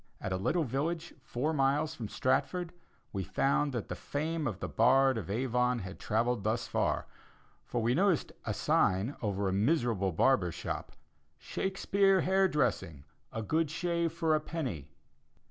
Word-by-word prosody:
At 95 - -3
a - - 0
little 160 - +1
village 160 +6 -2
four 135 +4 -2
miles 145 +2 +1
from 110 -4 -6
Stratford, 175 +6 0 0.4
we 95 -2 -2
found 140 - +1
that 120 -5 -4
the - - -4
fame 155 +2 -2
of 105 -5 -4
the - - -3
bard 130 +3 +4
of 105 -5 -5
Avon 125 +2 +1
had 95 -3 -7
travelled 115 0 0
thus 110 +3 0
far, - - 0 0.6
for 120 -2 -1
we 120 +2 +2
noticed 185 +1 +2
a - - -2
sign 100 +9 +1
over 100 -3 -1
a 95 - 0
miserable 110 - +1
barber's 90 -2 +2
shop, 85 - -5 0.4
"Shakespeare 195 0 +1
hair 190 +2 +3
dressing 105 - -1 0.3
a 110 - -4
good 155 +7 +1
shave 170 0 -1
for 165 -2 +1
a 155 - +3
penny." 130 - -4
130 Hz, 160 wpm, -31 LUFS, 105-160 Hz, 0.6 s, bard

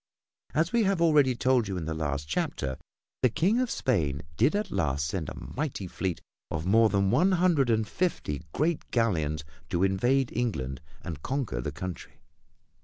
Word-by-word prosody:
As 165 +6 +2
we 235 - +4
have 195 -3 +2
already 150 -6 +4
told 125 -2 +2
you 95 -2 -3
in 85 - -4
the 80 - -2
last 75 -2 -2
chapter, 65 -2 -2 0.4
the 125 - +5
King 190 - +2
of 255 -1 +1
Spain 75 - 0
did 120 - +3
at 210 -1 -1
last 75 -6 0
send 80 0 -3
a - - -7
mighty 140 -8 -4
fleet 90 0 -3 0.3
of 80 0 -3
more 110 +4 +5
than 100 -1 +2
one 190 +3 +4
hundred 170 -8 +3
and 110 -2 +2
fifty 105 - -1
great 155 - -1
galleons 80 - 0 0.3
to 85 +1 +1
invade 120 +8 +2
England 65 - -2 0.2
and 80 -5 -6
conquer 125 - -2
the 75 - -3
country. 90 +3 -6
110 Hz, 175 wpm, -28 LUFS, -, 0.4 s, the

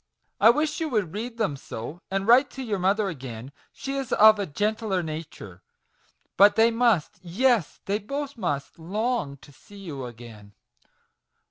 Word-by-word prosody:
I 220 - +7
wish 300 +6 +1
you 320 -1 -2
would 210 - -1
read 230 +3 -5
them 200 -10 0
so, 135 +4 -8
and 195 0 -1
write 250 +5 +5
to 265 - -6
your 210 -5 -2
mother 200 +3 +1
again: 130 -6 -7 0.2
she 275 - -6
is 270 -3 -4
of 215 0 +6
a 200 - -2
gentler 205 +3 -1
nature; 155 - -8 0.8
but 200 +2 +7
they 225 +1 +5
must 230 -8 +1
yes, 205 - +1
they 200 +2 -1
both 280 +6 -5
must, 165 - -4
long 210 - -2
to 145 - -17
see 205 +8 -17
you 155 -10 -7
again! 110 -4 -12
200 Hz, 160 wpm, -25 LUFS, 150-230 Hz, 0.8 s, I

